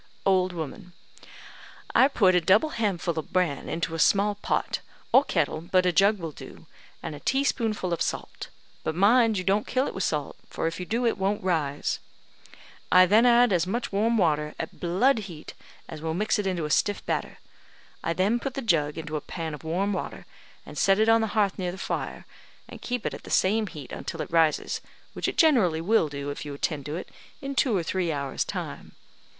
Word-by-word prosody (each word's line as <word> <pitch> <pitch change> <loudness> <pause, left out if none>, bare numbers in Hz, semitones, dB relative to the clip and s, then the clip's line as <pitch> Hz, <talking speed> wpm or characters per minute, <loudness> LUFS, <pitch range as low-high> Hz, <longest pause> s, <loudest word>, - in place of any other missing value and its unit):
Old 185 -1 +3
woman: 175 +3 -7 1.0
"I 260 - +6
put 200 -9 +3
a 180 - +4
double 200 - +4
handful 190 - -1
of 155 - -8
bran 175 -7 0
into 165 0 -2
a 165 - -4
small 200 +5 +3
pot, 205 - -2 0.3
or - - +7
kettle, 155 - -1
but 180 +2 +2
a 180 - +4
jug 200 +5 +4
will 165 -4 -5
do, - - -12 0.4
and - - -4
a 145 - -8
teaspoonful 225 - 0
of 170 - -3
salt; - - -3 0.4
but 155 - -2
mind 220 +3 +4
you 185 - -2
don't 200 +3 +1
kill 260 +1 +1
it - - -4
with 190 - -3
salt, 150 -3 -2
for - - -3
if 165 +2 -2
you 180 - -5
do, 235 +2 0
it 230 -3 +1
won't 200 +2 0
rise. 155 -6 -1 0.9
I 185 0 +8
then 215 +6 +5
add 240 -2 +5
as 175 0 +1
much 235 +6 -2
warm 220 +4 +2
water, 150 -5 +1
at 160 - -6
blood 220 +10 +2
heat, 155 -3 -10 0.3
as 155 -2 -8
will 160 0 -2
mix 210 +3 +1
it 200 - -1
into 175 -4 -1
a 150 - -4
stiff 205 +6 +1
batter. - - -2 0.7
I 165 - 0
then 200 +7 +1
put 265 +1 -5
the 275 - -3
jug 150 -8 +1
into 155 -1 -4
a - - -5
pan 165 0 -5
of 150 - -9
warm 185 +6 -1
water, - - -5 0.4
and - - -7
set 195 0 +4
it 220 +1 +3
on 225 0 +5
the 220 - 0
hearth 200 -3 +2
near 180 -1 -1
the 185 - -9
fire, - - -4 0.4
and - - -11
keep 245 -2 -3
it - - -1
at - - -8
the - - -12
same 215 +3 +2
heat 150 -7 -9
until - - -5
it - - -11
rises, 160 -2 +2 0.3
which - - -2
it - - -3
generally 225 - +4
will 170 -2 +2
do, 140 0 -5
if 145 +3 -6
you 145 -1 -6
attend 140 -1 -3
to 150 - -3
it, 175 - -6 0.3
in 275 0 -5
two 250 -6 +2
or 175 - -1
three 175 0 -1
hours' 140 -2 -2
time. - - -6
185 Hz, 210 wpm, -26 LUFS, 160-215 Hz, 1.0 s, I